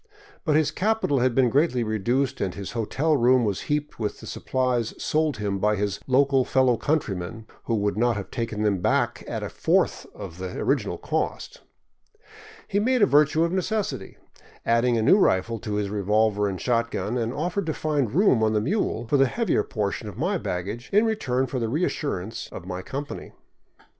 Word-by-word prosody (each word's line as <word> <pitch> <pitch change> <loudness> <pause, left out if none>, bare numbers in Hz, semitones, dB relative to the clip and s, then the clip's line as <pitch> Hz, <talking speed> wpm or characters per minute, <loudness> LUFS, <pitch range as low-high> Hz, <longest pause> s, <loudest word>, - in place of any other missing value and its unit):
But 155 -4 +2
his 155 -1 +3
capital 210 -9 +1
had 125 -1 +1
been 125 -3 +4
greatly 140 -4 +2
reduced 120 +5 0
and 95 -3 -2
his 100 -2 -6
hotel 135 +7 0
room 125 -1 +4
was 100 -3 -1
heaped 150 -2 -2
with 105 -2 -3
the - - -10
supplies 125 -3 -1
sold 155 -1 0
him 100 -2 -2
by 105 +2 +2
his 100 -1 -2
local 135 0 +3
fellow 130 -1 +3
coun 150 +7 +1
trymen, 100 -1 -6 0.2
who 115 - 0
would 105 -1 0
not 120 +1 +2
have 100 - -6
taken 115 -3 -3
them 100 -3 +1
back - - 0
at - - -4
a - - -3
fourth - - +1
of 95 -4 -8
the 95 -1 -5
original - - 0
cost. - - -3 1.1
He 200 - +1
made 250 +1 +2
a - - +9
virtue 150 0 +4
of 170 - 0
necessity, 190 - -2 0.5
added 115 +1 +3
a 110 - +1
new 190 - +6
rifle 115 - +2
to 105 0 -4
his 105 -1 -1
revolver 105 0 +2
and 95 -2 -3
shot 115 -2 +1
gun, 115 - -3
and 115 -2 -1
offered 175 +6 -2
to 160 - 0
find 145 -7 0
room 185 - +4
on 110 0 +2
the 105 - +3
mule 120 - -1
for 140 +5 +2
the 135 0 +5
heavier 230 - +1
portion 105 0 -3
of 105 - -11
my 180 +7 0
baggage 100 - -4
in 210 +3 +4
return 135 - 0
for 130 0 -3
the 115 -2 -1
reassurance 115 - -2
of 90 - -8
my 90 0 -5
company. 140 +8 -6
120 Hz, 195 wpm, -25 LUFS, 105-150 Hz, 1.1 s, a